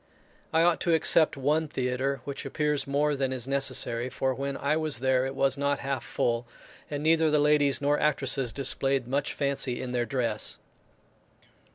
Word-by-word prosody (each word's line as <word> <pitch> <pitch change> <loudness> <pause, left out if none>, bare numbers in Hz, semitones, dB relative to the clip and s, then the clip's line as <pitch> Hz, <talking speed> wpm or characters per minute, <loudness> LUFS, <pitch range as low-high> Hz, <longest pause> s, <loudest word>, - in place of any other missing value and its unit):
I 160 +1 +3
ought 175 -1 +2
to 170 - +2
except 160 -1 +4
one 150 +4 +1
theatre, 130 0 -2
which 140 -1 -6
appears 150 +1 -1
more 145 +1 +1
than 135 -1 -1
is 130 -1 -3
necessary; 130 -3 -1
for 130 +1 -1
when 140 +1 -4
I 145 +2 0
was 155 -5 -1
there 130 +1 +1
it 135 - -6
was 135 0 +1
not 140 0 +1
half 135 -3 -2
full, 120 0 -1 0.4
and 145 0 -4
neither 160 0 +3
the 150 - +3
ladies 145 -2 +3
nor 145 +1 +2
actresses 135 -4 +1
displayed 135 -1 0
much 140 +3 -1
fancy 140 -3 -1
in 125 - -5
their 120 -1 -1
dress. 115 -3 -1
140 Hz, 175 wpm, -27 LUFS, 130-150 Hz, 0.4 s, except